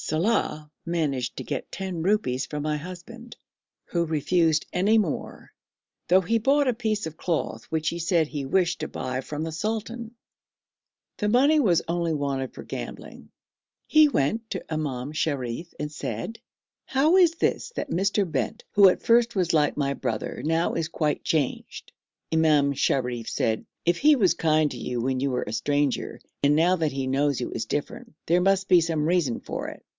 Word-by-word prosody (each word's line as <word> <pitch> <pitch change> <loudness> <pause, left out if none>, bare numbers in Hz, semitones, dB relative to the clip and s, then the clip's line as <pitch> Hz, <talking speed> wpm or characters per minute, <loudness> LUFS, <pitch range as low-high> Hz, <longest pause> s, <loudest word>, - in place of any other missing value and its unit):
Saleh 160 -1 0 0.2
managed 150 -7 -2
to - - -4
get - - -5
ten 190 -3 -4
rupees 165 - +1
from 150 -1 -4
my 155 0 0
husband, 185 +9 -9 0.5
who 170 -1 0
refused 160 0 +1
any 200 +5 +3
more, 190 -9 -3 0.5
though 185 +2 +6
he 225 +6 +1
brought 275 +4 +3
a 250 - +3
piece 220 -4 -2
of 160 -1 -6
cloth 170 -1 -2
which 160 -1 -1
he 170 - -5
said 170 -2 +2
he 145 -2 -4
wished 175 +6 +1
to - - -3
buy 130 0 -3
from 150 +3 -5
the 165 - -3
sultan. 225 +5 -4 1.0
The 210 - 0
money 280 +7 +4
was 175 - +3
only 170 -1 0
wanted 140 -3 -2
for - - -9
gambling. - - -8 0.6
He 310 -1 +6
went 220 - 0
to 185 -4 -5
Imam 140 -3 -3
Sharif 145 +1 -2
and 150 0 -3
said, 135 - -5 0.5
'How 295 +6 +3
is 355 -3 +6
this 335 - 0
that 290 - -4
Mr. 195 +1 +1
Bent, 130 -7 -3
who 200 -2 +7
at - - -2
first 235 0 +3
was 180 -3 +1
like 150 -2 +2
my 140 -1 0
brother, 120 -3 -4
now 165 +2 +1
is 165 -1 -2
quite 155 -3 -1
changed?' 155 -6 -2 0.4
Imam 150 -3 +3
Sharif 125 -4 -1
said, 110 -1 -1 0.2
'If 170 0 +2
he 300 +1 +6
was 190 -7 +4
kind 155 -2 +2
to - - -6
you 125 -1 -3
when 130 +2 -1
you 140 - +1
were 125 - -1
a 105 - -4
stranger, 145 +4 -1 0.2
and 145 +1 +5
now 170 +4 +4
that 160 -3 0
he 135 -1 -3
knows 140 +1 +1
you 125 - -4
is 110 - -3
different, 145 +6 -4
there 175 +2 +3
must 195 +1 +2
be 180 -2 +6
some 160 -2 0
reason 165 -9 +1
for - - -5
it.' - - -13
165 Hz, 180 wpm, -25 LUFS, 145-195 Hz, 1.0 s, who